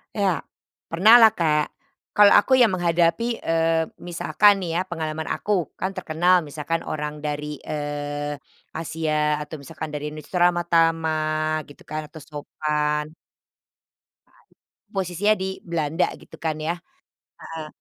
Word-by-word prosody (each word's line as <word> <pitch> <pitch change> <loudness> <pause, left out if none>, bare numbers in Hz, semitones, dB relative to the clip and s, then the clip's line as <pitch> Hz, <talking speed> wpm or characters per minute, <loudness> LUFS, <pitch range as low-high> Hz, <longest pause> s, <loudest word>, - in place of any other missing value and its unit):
Ya, 195 -4 +1 0.5
pernahlah 220 +7 +8
Kak, 150 -4 +1 0.4
kalau 205 -1 +7
aku 260 +6 +3
yang 240 -5 +5
menghadapi, 170 +2 +2 0.2
eee, 165 0 +2 0.2
misalkan 185 +3 +2
nih 170 - -3
ya - - +2
pengalaman 160 -2 -4
aku, 210 - -4 0.3
kan 190 - -1
terkenal 175 +1 +3
misalkan 155 +3 -3
orang 150 0 -4
dari, 150 0 -4
eee, 145 -1 -4 0.3
Asia 155 -1 -1
atau 150 - -8
misalkan 145 +2 -7
dari 150 0 -4
Indonesia 155 +4 -5
ramah 175 0 +3
tamah 155 -2 +1
gitu 145 - -15
kan 155 0 -5
atau 160 +1 -12
sopan. 150 0 -2 1.2
Saat - - -29 0.3
ini, - - -
posisinya 195 +3 +1
di 190 0 -3
Belanda 165 0 0
gitu - - -15
kan 160 -2 -1
ya, 160 +2 -1 0.6
heeh. 160 -1 -8
160 Hz, 130 wpm, -23 LUFS, 150-175 Hz, 1.2 s, pernahlah